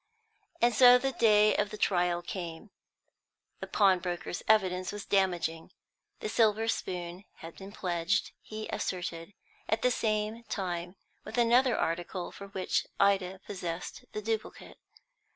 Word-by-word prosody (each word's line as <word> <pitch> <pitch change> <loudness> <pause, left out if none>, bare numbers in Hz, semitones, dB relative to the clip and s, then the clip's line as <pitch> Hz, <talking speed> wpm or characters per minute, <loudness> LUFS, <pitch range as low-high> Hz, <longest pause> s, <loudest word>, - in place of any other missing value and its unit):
And 240 0 +5
so 245 +2 +8
the 270 +2 -1
day 215 -3 +4
of 205 - +1
the 215 - -7
trial 175 -3 +1
came. 175 +2 -6 0.9
The - - -6
pawnbroker's 180 -3 +1
evidence 185 -4 +2
was 205 0 -7
damaging. 175 -4 0 0.5
The 435 - -2
silver 225 - +2
spoon 180 -1 -4
had 165 0 -11
been 195 +1 -10
pledged, 180 0 -1
he 215 0 -7
asserted, 175 0 -4 0.3
at 220 +1 0
the 250 - +4
same 215 0 -1
time 175 -3 -4 0.3
with - - -7
another 240 +1 +4
article 175 +2 -2
for 200 - -10
which 190 -1 -1
Ida 195 -1 +2
possessed 180 -3 -5
the 215 - -4
duplicate. 220 0 -4
195 Hz, 135 wpm, -30 LUFS, 175-215 Hz, 0.9 s, so